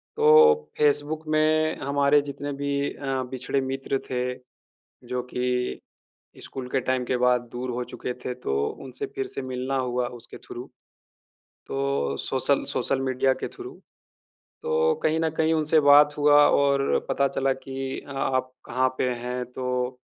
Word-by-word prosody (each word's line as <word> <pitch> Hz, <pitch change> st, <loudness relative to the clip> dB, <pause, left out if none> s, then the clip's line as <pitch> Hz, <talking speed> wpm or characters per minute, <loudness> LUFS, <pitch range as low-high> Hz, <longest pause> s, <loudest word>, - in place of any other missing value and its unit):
तो 460 Hz, 0 st, +5 dB
फ़ेसबुक 150 Hz, +1 st, +1 dB
में 155 Hz, 0 st, +2 dB
हमारे 140 Hz, +1 st, +3 dB
जितने 145 Hz, +1 st, -5 dB
भी 140 Hz, 0 st, -1 dB, 0.2 s
अ, 135 Hz, -2 st, -2 dB
बिछड़े 130 Hz, +2 st, -2 dB
मित्र 135 Hz, 0 st, -2 dB
थे, 125 Hz, 0 st, -1 dB, 0.7 s
जो 125 Hz, 0 st, -2 dB
कि 125 Hz, 0 st, -1 dB, 0.7 s
स्कूल 130 Hz, -2 st, -7 dB
के 135 Hz, -, +1 dB
टाइम 130 Hz, 0 st, -1 dB
के 125 Hz, -, 0 dB
बाद 125 Hz, -1 st, +2 dB
दूर 125 Hz, +1 st, -4 dB
हो 125 Hz, 0 st, -3 dB
चुके 125 Hz, -, -5 dB
थे 125 Hz, -, -2 dB
तो 70 Hz, -, +1 dB, 0.3 s
उनसे 130 Hz, -1 st, -5 dB
फ़िर 135 Hz, -, -2 dB
से 135 Hz, -, -6 dB
मिलना 130 Hz, +1 st, -3 dB
हुआ 125 Hz, -1 st, 0 dB
उसके 115 Hz, -, -11 dB
थ्रू। 120 Hz, -, -9 dB, 1.0 s
तो 70 Hz, 0 st, -1 dB
सोशल -, -, +1 dB
सोशल 135 Hz, -, 0 dB
मीडिया 130 Hz, 0 st, +1 dB
के -, -, -5 dB
थ्रू, 375 Hz, 0 st, -9 dB, 0.9 s
तो 470 Hz, 0 st, +2 dB
कहीं 160 Hz, +1 st, +2 dB
न 160 Hz, 0 st, +1 dB
कहीं 160 Hz, 0 st, +3 dB
उनसे 155 Hz, 0 st, +3 dB
बात 145 Hz, 0 st, +6 dB
हुआ 145 Hz, 0 st, +5 dB
और 140 Hz, -1 st, +3 dB
पता 140 Hz, 0 st, +2 dB
चला 135 Hz, 0 st, 0 dB
कि 135 Hz, 0 st, -5 dB
आप 130 Hz, -2 st, -1 dB
कहाँ 130 Hz, +2 st, +1 dB
पे 125 Hz, -, +1 dB
हैं? 125 Hz, +1 st, -4 dB
तो 125 Hz, 0 st, -2 dB
135 Hz, 150 wpm, -25 LUFS, 125-145 Hz, 1.0 s, बात